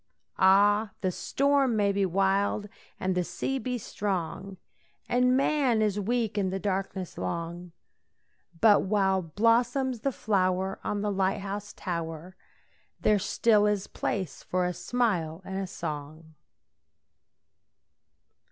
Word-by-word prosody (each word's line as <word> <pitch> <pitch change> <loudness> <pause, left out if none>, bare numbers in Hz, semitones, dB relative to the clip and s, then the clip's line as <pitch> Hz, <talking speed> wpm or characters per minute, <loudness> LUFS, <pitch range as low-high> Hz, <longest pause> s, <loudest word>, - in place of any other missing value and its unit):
Ah, 205 +3 +4
the 185 - 0
storm 275 +4 +1
may 205 -2 +2
be 200 -1 +1
wild 195 +3 +1 0.3
and 185 0 0
the 180 0 0
sea 270 +9 -3
be 250 -1 -2
strong, 195 -3 -4 0.5
And 250 +1 +3
man 275 -5 +2
is 210 -1 0
weak 220 0 0
and 190 -2 0
the 190 - -1
darkness 190 -2 -3
long, 170 +1 -4 0.9
But 210 0 +6
while 190 -1 +1
blossoms 235 - +1
the 275 +5 -1
flower 190 -4 0
on 205 -1 -2
the 210 0 0
light 195 0 0
house 200 +1 -5
tower 170 0 -5 0.6
There 210 -1 +3
still 210 +1 +3
is 205 -2 0
place 185 -6 -3
for 180 0 -1
a 180 - -1
smile 185 -7 -1
and 190 0 -4
a 195 - -3
song. 155 -2 -7
195 Hz, 125 wpm, -28 LUFS, 185-220 Hz, 0.9 s, But